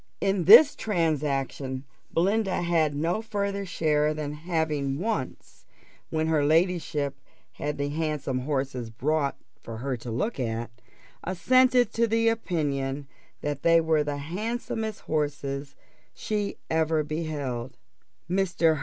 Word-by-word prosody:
In 195 Hz, -3 st, +1 dB
this 295 Hz, -, +9 dB
transaction 140 Hz, -7 st, -1 dB, 0.3 s
Belinda 195 Hz, +2 st, +1 dB
had 160 Hz, -4 st, +2 dB
no 165 Hz, +8 st, 0 dB
farther 200 Hz, -2 st, -2 dB
share 150 Hz, -3 st, +1 dB
than 150 Hz, -1 st, -4 dB
having 150 Hz, -4 st, -1 dB
once, 190 Hz, -, -4 dB, 0.4 s
when 160 Hz, 0 st, 0 dB
her 160 Hz, -2 st, +2 dB
ladyship 155 Hz, -3 st, +1 dB, 0.4 s
had 145 Hz, 0 st, -4 dB
the 140 Hz, 0 st, -1 dB
handsome 150 Hz, -4 st, -2 dB
horses 130 Hz, -3 st, -2 dB
brought 140 Hz, +5 st, 0 dB, 0.2 s
for 115 Hz, -1 st, -7 dB
her 130 Hz, +3 st, -2 dB
to 120 Hz, +1 st, -8 dB
look 130 Hz, -, -2 dB
at, 115 Hz, -1 st, -2 dB, 0.5 s
assented 250 Hz, +6 st, +3 dB
to 230 Hz, 0 st, +2 dB
the 225 Hz, +1 st, +3 dB
opinion 145 Hz, -10 st, -1 dB, 0.4 s
that 145 Hz, -1 st, -3 dB
they 165 Hz, 0 st, +5 dB
were 160 Hz, -2 st, +2 dB
the 145 Hz, -1 st, -3 dB
handsomest 215 Hz, +7 st, -3 dB
horses 145 Hz, -2 st, -2 dB, 0.4 s
she 210 Hz, -2 st, -2 dB
ever 160 Hz, -1 st, +1 dB
beheld. 145 Hz, -6 st, -4 dB, 0.5 s
Mr. 175 Hz, -4 st, +2 dB
155 Hz, 120 wpm, -27 LUFS, 140-185 Hz, 0.5 s, this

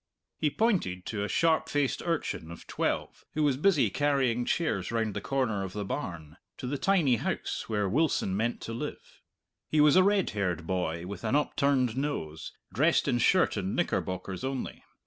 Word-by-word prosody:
He 155 Hz, -, +2 dB
pointed 155 Hz, -, 0 dB
to 105 Hz, -2 st, -3 dB
a -, -, -1 dB
sharp 160 Hz, +7 st, +2 dB
faced 145 Hz, -3 st, 0 dB
urchin 165 Hz, -, -2 dB
of 85 Hz, -, -10 dB
twelve -, -, -2 dB
who 155 Hz, -, +1 dB
was 145 Hz, -3 st, +3 dB
busy 145 Hz, -, +3 dB
carrying 135 Hz, -4 st, +1 dB
chairs 105 Hz, -, 0 dB
round 110 Hz, -2 st, 0 dB
the -, -, -4 dB
corner 125 Hz, -8 st, 0 dB
of 95 Hz, -1 st, -6 dB
the 105 Hz, -1 st, -3 dB
barn, 85 Hz, -, -5 dB, 0.2 s
to -, -, -6 dB
the 135 Hz, +2 st, -2 dB
tiny 170 Hz, -11 st, +3 dB
house -, -, -3 dB
where 105 Hz, -2 st, 0 dB
Wilson 125 Hz, -5 st, +1 dB
meant 115 Hz, +4 st, -1 dB
to 115 Hz, -, -5 dB
live. 115 Hz, -, -7 dB, 0.5 s
He 155 Hz, -, +2 dB
was 150 Hz, -1 st, +6 dB
a 185 Hz, -, +8 dB
red 200 Hz, -1 st, +2 dB
haired 90 Hz, -5 st, -2 dB
boy 85 Hz, -2 st, -2 dB
with 95 Hz, 0 st, -7 dB
an -, -, +1 dB
upturned 140 Hz, -5 st, +2 dB
nose, 130 Hz, -, -3 dB, 0.2 s
dressed 155 Hz, +7 st, +3 dB
in 125 Hz, -3 st, +2 dB
shirt 185 Hz, +9 st, +3 dB
and 95 Hz, +1 st, -2 dB
knickerbockers 95 Hz, 0 st, -2 dB
only. 135 Hz, -1 st, -4 dB
120 Hz, 180 wpm, -29 LUFS, 95-150 Hz, 0.5 s, a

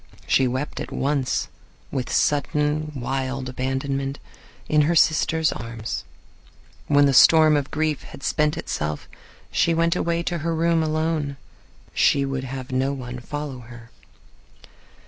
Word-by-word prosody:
She 130 Hz, -, +3 dB
wept 130 Hz, +4 st, -3 dB
at -, -, -6 dB
once, 140 Hz, -2 st, 0 dB, 0.4 s
with 130 Hz, -3 st, -3 dB
sudden, 150 Hz, +1 st, +1 dB
wild 130 Hz, +1 st, -3 dB
abandonment, 135 Hz, +2 st, -2 dB, 0.5 s
in 150 Hz, 0 st, +4 dB
her 170 Hz, -, +2 dB
sister's 160 Hz, 0 st, +3 dB
arms. 115 Hz, 0 st, -5 dB, 0.8 s
When 145 Hz, 0 st, +5 dB
the 140 Hz, -, +3 dB
storm 155 Hz, +3 st, +7 dB
of 145 Hz, -1 st, -1 dB
grief 155 Hz, -1 st, -1 dB
had -, -, -12 dB
spent 150 Hz, -1 st, +1 dB
itself 75 Hz, 0 st, -3 dB, 0.4 s
she 165 Hz, -, +2 dB
went 165 Hz, +1 st, +2 dB
away 170 Hz, -1 st, 0 dB
to 170 Hz, 0 st, -2 dB
her 165 Hz, +2 st, -1 dB
room 165 Hz, 0 st, +2 dB
alone. 155 Hz, -2 st, -1 dB, 0.6 s
She 140 Hz, -1 st, +3 dB
would 135 Hz, -1 st, -3 dB
have 130 Hz, 0 st, -6 dB
no 130 Hz, +2 st, +1 dB
one 125 Hz, -2 st, -6 dB
follow 145 Hz, 0 st, -5 dB
her. 120 Hz, 0 st, -13 dB
140 Hz, 135 wpm, -23 LUFS, 130-155 Hz, 0.8 s, storm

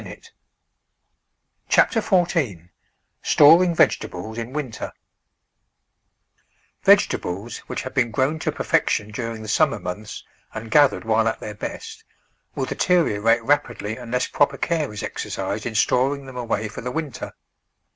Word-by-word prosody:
CHAPTER 225 Hz, -, +4 dB
FOURTEEN 155 Hz, -, 0 dB, 0.5 s
STORING 170 Hz, +4 st, +6 dB
VEGETABLES 110 Hz, -6 st, 0 dB
IN 115 Hz, +2 st, -5 dB
WINTER 135 Hz, -5 st, -5 dB, 1.9 s
V -, -, +5 dB
EGETABLES, 100 Hz, +7 st, +1 dB
wliicli -, -, -3 dB
have 130 Hz, -, -7 dB
been 120 Hz, -3 st, +1 dB
gro^vn 135 Hz, +8 st, 0 dB
to -, -, 0 dB
perfection 105 Hz, +1 st, 0 dB
during 115 Hz, 0 st, -5 dB
the -, -, -8 dB
summer -, -, +2 dB
months 100 Hz, +4 st, -7 dB, 0.3 s
and 110 Hz, +1 st, -7 dB
gathered 145 Hz, -5 st, +4 dB
while 110 Hz, 0 st, +2 dB
at 110 Hz, -, -1 dB
their 105 Hz, -, -6 dB
best, 445 Hz, -, -7 dB, 0.5 s
will -, -, -1 dB
deteriorate 115 Hz, -, +2 dB
rapidly 130 Hz, -6 st, 0 dB
unless 125 Hz, +1 st, -2 dB
proper 145 Hz, -, +1 dB
care 160 Hz, -6 st, -1 dB
is 105 Hz, -, -6 dB
exercised -, -, -4 dB
in 115 Hz, -, -6 dB
storing 135 Hz, +5 st, +1 dB
them 130 Hz, -1 st, -11 dB
away 115 Hz, -3 st, -2 dB
for 105 Hz, -, -8 dB
the 125 Hz, -, -4 dB
win 150 Hz, +2 st, -3 dB
ter. -, -, -8 dB
125 Hz, 135 wpm, -22 LUFS, 110-145 Hz, 1.9 s, STORING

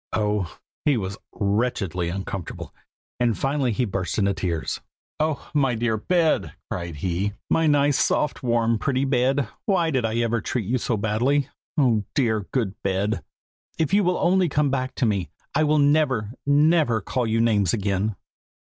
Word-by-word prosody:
Oh! 105 Hz, -5 st, -1 dB, 0.3 s
he 145 Hz, -4 st, +3 dB
was 100 Hz, -1 st, -4 dB
wretchedly 100 Hz, -5 st, -1 dB
uncomfortable, 95 Hz, -1 st, -5 dB, 0.5 s
and 120 Hz, -3 st, +2 dB
finally 135 Hz, -2 st, 0 dB
he 125 Hz, +3 st, 0 dB
burst 95 Hz, -3 st, -3 dB
into 100 Hz, -2 st, +2 dB
tears. 85 Hz, -3 st, -2 dB, 0.4 s
'Oh! 155 Hz, -1 st, -1 dB
my 135 Hz, -5 st, +2 dB
dear 115 Hz, -1 st, 0 dB
bed!' 165 Hz, +8 st, +1 dB, 0.2 s
cried 85 Hz, -2 st, -4 dB
he. 90 Hz, +6 st, -1 dB, 0.2 s
'My 165 Hz, -1 st, +3 dB
nice, 145 Hz, -1 st, +3 dB
soft, 150 Hz, -, 0 dB
warm, 115 Hz, -3 st, +1 dB
pretty 135 Hz, +2 st, 0 dB
bed! 130 Hz, 0 st, +2 dB, 0.2 s
why 175 Hz, -5 st, +2 dB
did 130 Hz, -4 st, +1 dB
I 110 Hz, 0 st, -1 dB
ever 115 Hz, -1 st, +1 dB
treat 115 Hz, 0 st, -2 dB
you 125 Hz, +5 st, 0 dB
so 115 Hz, -1 st, -1 dB
badly? 125 Hz, +7 st, +1 dB, 0.3 s
oh! 120 Hz, -7 st, +3 dB
dear 110 Hz, -7 st, +1 dB
good 115 Hz, -8 st, 0 dB
bed, 95 Hz, -1 st, -1 dB, 0.5 s
if 160 Hz, +3 st, 0 dB
you 205 Hz, +1 st, +5 dB
will 180 Hz, 0 st, +1 dB
only 180 Hz, 0 st, +3 dB
come 145 Hz, -1 st, +1 dB
back 130 Hz, -1 st, -2 dB
to 125 Hz, -, +1 dB
me, 100 Hz, -7 st, 0 dB, 0.2 s
I 155 Hz, -, +3 dB
will 150 Hz, +1 st, +3 dB
never, 140 Hz, -7 st, +2 dB, 0.2 s
never 145 Hz, -4 st, +4 dB
call 120 Hz, +4 st, -2 dB
you 110 Hz, +1 st, +1 dB
names 105 Hz, -6 st, +3 dB
again. 100 Hz, 0 st, 0 dB
120 Hz, 165 wpm, -24 LUFS, 100-140 Hz, 0.5 s, you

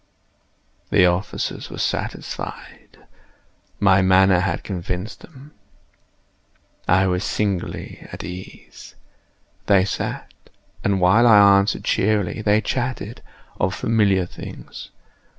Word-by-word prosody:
The -, -, +5 dB
officers 90 Hz, +3 st, -2 dB
were -, -, -8 dB
satisfied. -, -, -5 dB, 0.7 s
My 95 Hz, -1 st, +4 dB
manner 95 Hz, 0 st, +4 dB
had 95 Hz, +2 st, -2 dB
convinced 90 Hz, +2 st, -5 dB
them. 145 Hz, -2 st, -15 dB, 1.4 s
I 95 Hz, +2 st, +4 dB
was 90 Hz, 0 st, 0 dB
singularly 100 Hz, -5 st, -3 dB
at -, -, -7 dB
ease. 90 Hz, +1 st, -10 dB, 0.7 s
They 95 Hz, -2 st, +4 dB
sat, -, -, -4 dB, 0.5 s
and 100 Hz, -1 st, +1 dB
while 100 Hz, +7 st, +5 dB
I 100 Hz, -3 st, +7 dB
answered 100 Hz, +1 st, -1 dB
cheerily, 105 Hz, 0 st, 0 dB
they 105 Hz, 0 st, +3 dB
chatted 125 Hz, +1 st, -3 dB, 0.4 s
of 95 Hz, 0 st, 0 dB
familiar 100 Hz, -4 st, +2 dB
things. -, -, -10 dB
95 Hz, 100 wpm, -21 LUFS, 95-105 Hz, 1.4 s, I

